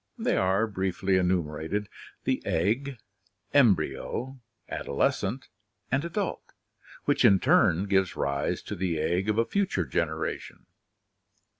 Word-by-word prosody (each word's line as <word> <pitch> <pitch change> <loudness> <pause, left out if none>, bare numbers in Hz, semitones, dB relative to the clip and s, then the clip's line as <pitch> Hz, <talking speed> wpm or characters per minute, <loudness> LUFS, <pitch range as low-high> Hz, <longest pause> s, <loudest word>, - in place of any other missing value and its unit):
They - - 0
are, 95 +4 +2
briefly 95 -2 -1
enumerated, 90 +2 -1 0.4
the 130 - 0
egg, 110 +10 0 0.6
embryo, 130 +1 +1 0.3
adolescent, 100 - -1 0.4
and 135 +3 +1
adult, 185 +4 -4 0.5
which - - +2
in 100 -1 +6
turn 85 +1 +4
gives 95 -2 +1
rise 70 0 -1
to - - -5
the 90 -3 -1
egg 90 +6 0
of 105 - +1
a 115 - +3
future 200 +5 0
generation. - - -3
95 Hz, 115 wpm, -27 LUFS, 90-125 Hz, 0.6 s, in